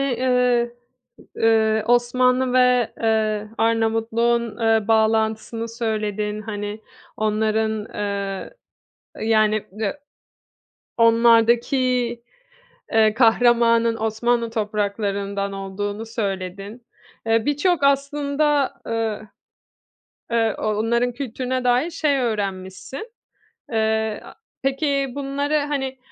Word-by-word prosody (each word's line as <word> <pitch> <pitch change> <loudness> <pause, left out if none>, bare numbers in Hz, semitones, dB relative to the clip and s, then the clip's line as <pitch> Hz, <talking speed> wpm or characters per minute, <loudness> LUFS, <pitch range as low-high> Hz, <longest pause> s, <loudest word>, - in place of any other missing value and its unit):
eee, 250 -2 +1 0.6
eee, 220 -1 +3
Osmanlı 250 +1 +2
ve, 250 -2 +3
eee, 215 -1 0
Arnavutluk'un, 225 0 +1
eee, 225 -1 +2
bağlantısını 220 +1 +1
söyledin. 215 -2 -3
Hani, 205 0 -5 0.4
onların, 215 0 0
eee 200 - -4 0.7
yani, 215 -1 +2
eee, 215 +5 -1 1.0
onlardaki, 230 +2 +4 1.2
eee, 220 -1 +4
kahramanın 230 0 +4
Osmanlı 230 +1 0
topraklarından 200 -2 -2
olduğunu 205 +3 -4
söyledin. 200 +1 -5 0.4
Eee, 225 0 +2
birçok 290 +2 +1
aslında, 280 0 +1
eee, 225 -2 -2 1.1
eee, 225 -2 +1
o - - -7
onların 235 +3 +1
kültürüne 255 0 -3
dair 250 +7 +2
şey 300 -4 0
öğrenmişsin. 205 - -4 0.6
Eee, 220 -1 0
a - - -12 0.3
peki 275 0 0
bunları, 285 +1 -1
hani, 275 -3 -3
225 Hz, 85 wpm, -22 LUFS, 215-250 Hz, 1.2 s, onlardaki